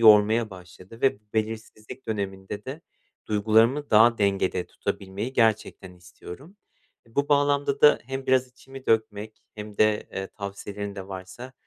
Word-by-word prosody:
yormaya 110 +1 +6
başladı 90 +4 -13
ve 130 -6 +2
bu - - -41
belirsizlik 110 +2 -4
döneminde 100 0 -4
de 140 +5 -6 0.5
duygularımı 110 +7 +3
daha 115 +2 +6
dengede 95 -3 +1
tutabilmeyi 100 +6 -4
gerçekten 110 -5 +1
istiyorum. 90 - -12 0.5
Bu 140 +6 -1
bağlamda 145 -1 +2
da 150 - +7
hem 135 0 -5
biraz 130 0 +3
içimi 135 +1 -13
dökmek 110 -1 0
hem 105 -1 -8
de, 110 -1 +2
eee, 95 0 -3
tavsiyelerin 100 0 -6
de 95 0 -8
varsa, 95 +7 -8
110 Hz, 135 wpm, -26 LUFS, 100-130 Hz, 0.5 s, da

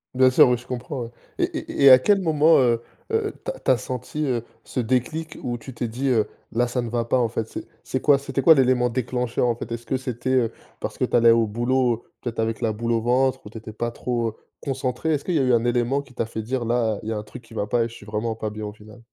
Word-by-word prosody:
Bien 130 0 +5
sûr, 130 - +6
oui, 125 - +2
je 120 - -14
comprends, 125 +1 -4
ouais 115 - -7 0.3
et - - +1 0.2
et - - -3
et - - +11
à 130 - +10
quel 200 +9 +3
moment, 160 -2 +4
heu 120 -3 +3 0.3
heu, 445 -2 0
tu - - -1
as - - -11
tu - - -3
as 130 - +4
senti, 130 +4 -4
heu, 120 -4 -1 0.2
ce - - -5
déclic 130 +7 -1
où 120 -1 -3
tu 130 - -9
t'es 120 0 -3
dit, 125 +5 -3
heu: 110 -4 +2 0.2
«Là, 120 +2 +1
ça 125 +1 -1
ne 120 - -4
va 115 0 -1
pas, 130 - +2
en 120 -2 +1
fait»? 115 0 -2
C'est - - -7 0.2
c'est 130 - -3
quoi 145 -2 +5
c'était 135 0 -3
quoi, 160 +3 +8
l'élément 125 -2 +3
déclencheur, 125 0 -1
en 120 - +1
fait? 120 - -8
Est-ce 115 0 -5
que 135 - -1
c'était, 125 0 -3
heu, 125 -3 +2 0.3
parce - - -5
que - - +1
tu - - -2
allais 115 -1 +6
au 115 0 +5
boulot, 120 +2 0 0.2
peut-être 120 -2 -5
avec 110 0 -1
la 115 - +1
boule 115 +2 -2
au 115 -1 +2
ventre 130 +3 +2
ou - - -8
tu 115 - -8
étais 110 0 -9
pas 120 +2 -2
trop, 120 -1 -2
heu, - - -10 0.3
concentrée? 135 +3 -1
Est-ce 145 - -1
qu'il 180 - -1
y - - +3
a - - +2
eu 125 -1 +3
un 115 -1 +3
élément 120 +3 +1
qui 125 -3 -18
t'a 115 - -1
fait 110 0 -5
dire: 120 +2 -2
«Là, 115 -3 +1
il 110 - -4
y - - -1
a 110 - -2
un 105 - -4
truc 110 +3 -11
qui 115 - -16
va 105 -2 -2
pas 120 +2 +2
et - - -1
je - - -13
suis 105 - -13
vraiment 110 +2 -2
pas 110 -1 -3
bien» 105 0 -6
au 105 - -6
final? 105 +2 -15
120 Hz, 295 wpm, -23 LUFS, 115-130 Hz, 0.3 s, et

